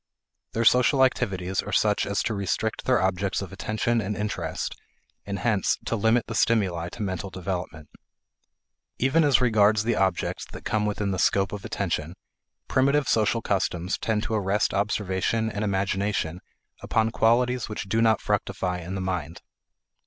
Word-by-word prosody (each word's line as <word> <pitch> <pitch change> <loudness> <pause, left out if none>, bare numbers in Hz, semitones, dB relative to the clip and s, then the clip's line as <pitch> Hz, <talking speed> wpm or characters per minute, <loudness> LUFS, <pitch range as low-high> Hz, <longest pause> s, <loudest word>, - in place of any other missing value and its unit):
Their 115 +1 0
social 125 +4 +5
activities 95 -8 0
are - - -7
such 105 -1 +2
as 100 -1 0
to 115 - -1
restrict 105 +2 -2
their 130 -3 +3
objects 95 +1 0
of 95 0 -9
attention 110 +3 -1
and 105 0 -3
interest, 105 0 -3 0.5
and 100 -1 -3
hence 110 -4 +1
to - - -1
limit 115 +2 +2
the 115 - -6
stimuli 95 -7 +1
to 115 - -5
mental 95 0 -3
development. 90 -4 -5 1.1
Even 140 +6 +3
as 140 -4 +4
regards 110 -3 +4
the 120 +1 +1
objects 95 -3 0
that - - -10
come 105 -1 0
within 105 -1 -1
the 95 - -2
scope 95 +2 +2
of 105 - -6
attention, 85 -3 -3 0.5
primitive 140 +1 +2
social 115 +1 +2
customs 90 -2 -1
tend 110 -1 0
to - - -3
arrest 105 -1 +1
observation 105 +2 0
and 105 0 -3
imagination 95 -3 -1 0.4
upon 110 0 +1
qualities 120 +1 +2
which 105 - -4
do 110 +4 +1
not 110 -2 +3
fructify 95 -3 -1
in 90 +2 -6
the 95 - -3
mind. 90 -3 -4
105 Hz, 160 wpm, -25 LUFS, 95-115 Hz, 1.1 s, social